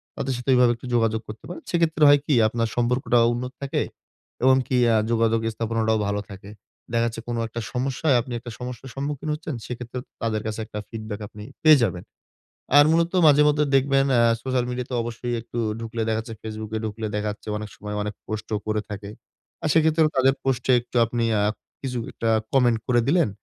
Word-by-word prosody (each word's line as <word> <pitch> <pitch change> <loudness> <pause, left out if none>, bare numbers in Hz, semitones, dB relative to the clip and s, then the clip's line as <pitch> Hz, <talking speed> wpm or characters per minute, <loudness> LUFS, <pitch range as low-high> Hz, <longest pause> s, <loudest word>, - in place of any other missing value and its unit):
তাদের 135 0 -2
সাথে 125 +2 -5
ওইভাবে 125 -1 +5
একটু 120 +2 -10
যোগাযোগ 115 -1 +2
করতে 105 +1 -9
পারেন। 180 - -8
সেই 175 - +1
ক্ষেত্রে 160 -2 +2
হয় 145 0 +7
কি, 150 - +1
আপনার 115 +1 -1
সম্পর্কটা 120 +1 +1 0.2
উন্নত 125 +2 -4
থাকে 140 -1 -1 0.6
এবং 130 0 +6
কি 130 - +1 0.2
আ - - +4 0.2
যোগাযোগ 115 0 +2 0.2
স্থাপনাটাও 110 -1 0
ভালো 100 0 -1
থাকে। 100 0 -10 0.4
দেখা 115 0 +2
যাচ্ছে 115 0 -5
কোনো 120 -1 -2
একটা 115 +1 -5
সমস্যায় 135 +3 +1
আপনি 125 +1 -7
একটা 120 +1 -9
সমস্যার 125 +1 -7
সম্মুখীন 145 +2 -3
হচ্ছেন, 150 -1 -5
সেই 125 - -4
ক্ষেত্রেও 125 +1 -6 0.2
তাদের 110 -2 -1
কাছে 110 0 -4
একটা 105 -1 -6
feedback 110 -2 -6
আপনি 105 +1 -11 0.2
পেয়ে 155 -4 +7
যাবেন। 90 -5 -1 0.7
আর 145 - +8
মূলত 165 +1 +2 0.2
মাঝে 145 0 +6
মধ্যে 150 0 +3
দেখবেন 135 0 +3
অ্যা 120 - +5 0.2
সোশ্যাল 130 -2 0
মিডিয়াতে 125 +1 -4
অবশ্যই 120 +1 -4
একটু 120 +1 -6 0.2
ঢুকলে 115 0 -4
দেখা 110 - +1
যাচ্ছে, 115 0 -8
Facebook 110 -1 -6 0.2
ঢুকলে 110 +1 -4
দেখা 105 0 -1
যাচ্ছে 105 - -13
অনেক 105 0 -6
সময় 105 0 -6
অনেক 105 0 -3
পোস্টও 110 0 -3
করে 110 0 0
থাকে। 100 -1 -6 0.5
আর - - +1
সেই 160 - +5
ক্ষেত্রেও 160 0 +3
তাদের 130 +1 +5
পোস্টে 130 -1 +1
একটু 120 - -17
আপনি 115 +1 -2
অ্যা 105 -1 +2 0.4
কিছু 125 -2 -3
একটা 115 - -2 0.2
কমেন্ট 125 -4 +4
করে 120 -1 +3
দিলেন। 165 -2 +3
120 Hz, 195 wpm, -24 LUFS, 110-135 Hz, 0.7 s, আর